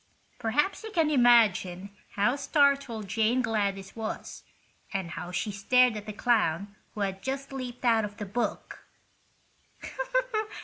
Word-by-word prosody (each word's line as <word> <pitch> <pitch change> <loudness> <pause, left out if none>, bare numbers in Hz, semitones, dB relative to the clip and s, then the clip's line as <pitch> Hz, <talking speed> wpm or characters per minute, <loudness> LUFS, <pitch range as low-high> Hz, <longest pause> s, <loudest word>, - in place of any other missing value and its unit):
Perhaps 295 - 0
you 440 - -6
can 325 -7 +1
imagine 205 -7 +3 0.2
how 210 +6 +2
startled 280 -7 +1
Jane 225 +5 +1
Gladys 200 -4 -2
was, 220 -1 -5 0.5
and 190 -4 -3
how 175 +2 -6
she 210 +4 -2
stared 245 +4 +3
at 210 0 -7
the - - -3
clown 205 -4 0 0.2
who 210 - -4
had 195 -1 -2
just 275 +1 -4
leaped 250 -2 -6
out 225 -2 +4
of 205 0 -6
the 210 - -5
book. 230 +5 -4
220 Hz, 135 wpm, -28 LUFS, 200-250 Hz, 0.5 s, out